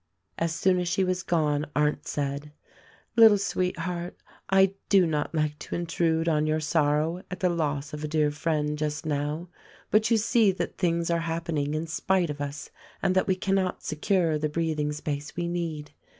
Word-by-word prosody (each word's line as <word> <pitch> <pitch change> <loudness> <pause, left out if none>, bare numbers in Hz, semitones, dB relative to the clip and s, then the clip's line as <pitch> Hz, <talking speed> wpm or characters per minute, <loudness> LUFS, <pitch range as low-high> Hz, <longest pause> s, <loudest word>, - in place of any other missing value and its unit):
As 165 0 0
soon 180 +2 +2
as 180 - -1
she 190 +2 +1
was 185 0 0
gone 150 -4 0
Arndt 150 0 +1
said, 145 +1 -3 0.6
"Little 225 -3 +8
sweet 185 -2 -1
heart, 175 +1 -4 0.3
I 195 0 +4 0.2
do 195 -3 +6
not 155 0 -1
like 150 -1 0
to - - -5
intrude 165 -1 0
on 155 -2 +2
your 155 0 +1
sorrow 155 +2 +1
at 180 - -6
the 185 -3 +2
loss 150 -4 -2
of 150 0 -5
a - - -1
dear 150 -1 +1
friend 150 -1 -1
just 150 +1 -2
now, 150 +3 -2 0.4
but 215 +1 +4
you 230 - +4
see 220 -1 +3
that - - -4
things 170 -2 +1
are 170 - +2
hap 165 0 -3
pening 150 -3 -1
in 155 +2 -2
spite 175 +1 0
of 145 0 -7
us 145 0 -5 0.3
and 185 - +3
that 190 - +2
we 190 - +3
cannot 190 -1 -1
secure 160 0 +1
the 150 0 -1
breath 160 0 -1
ing 150 0 0
space 150 -1 -4
we 175 0 -2
need. 165 -4 -3
165 Hz, 195 wpm, -27 LUFS, 150-180 Hz, 0.6 s, Little